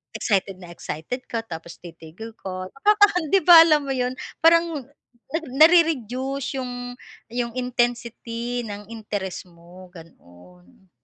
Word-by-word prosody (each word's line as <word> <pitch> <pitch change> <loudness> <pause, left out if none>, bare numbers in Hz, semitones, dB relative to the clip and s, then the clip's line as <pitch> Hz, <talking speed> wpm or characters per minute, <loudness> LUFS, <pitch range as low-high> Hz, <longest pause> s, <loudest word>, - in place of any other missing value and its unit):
excited 195 -2 0
na 175 -2 -12
excited 170 - -6
ka 230 -1 -3
tapos 170 -3 -9
titigil 170 +6 -11
ka, 185 -1 -6
nakakahan 410 +3 +3
'di 390 - +4
ba, 350 -1 +9
alam 305 -3 +3
mo 275 - -3
'yun, 250 0 -2 0.3
parang 330 -5 +3 0.5
nag 325 0 -2
nare-reduce 275 -5 +3
'yung 245 -1 -6 0.3
'yung 240 0 -3
intensity 240 -1 -2
ng 205 -1 -8
interest 205 -4 -5
mo, 175 +2 -16
gano'n. 90 - -18
235 Hz, 125 wpm, -23 LUFS, 185-275 Hz, 0.5 s, ba